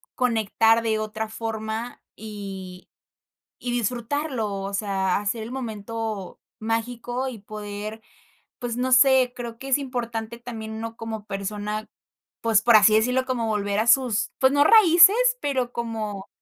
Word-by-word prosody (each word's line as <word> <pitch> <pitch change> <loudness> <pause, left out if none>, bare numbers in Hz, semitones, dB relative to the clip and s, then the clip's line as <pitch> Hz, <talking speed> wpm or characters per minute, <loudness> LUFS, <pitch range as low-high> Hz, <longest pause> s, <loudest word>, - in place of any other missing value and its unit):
conectar 225 -1 +2
de 220 -1 0
otra 215 +1 -4
forma, 220 +1 -5
y 195 -4 -8 0.7
y 245 - -3
disfrutarlo, 245 +1 -2
o 195 0 -5
sea, 195 -2 0
hacer 220 +2 -2
el 225 - -8
momento 225 -4 -5 0.2
mágico, 240 +3 -2
y 245 -4 -6
poder, 210 +1 -7 0.6
pues, 240 -1 -3
no 255 +1 -1
sé, 255 -1 +5
creo 235 -2 -7
que 270 - -8
es 270 - +4
importante 235 -4 -4
también 230 -2 -7
uno 225 +1 -6
como 220 -2 -6
persona, 210 +1 -4 0.5
pues, 225 -2 +3
por 235 -1 +7
así 215 0 +6
decirlo, 250 +4 +2
como 240 -3 -1
volver 205 -1 0
a 225 - -1
sus, 245 -4 +3
pues, 265 0 +4
no 285 0 +4
raíces, 360 0 +7 0.2
pero 260 -4 -1
como, 215 -4 -4
225 Hz, 145 wpm, -24 LUFS, 215-245 Hz, 0.7 s, por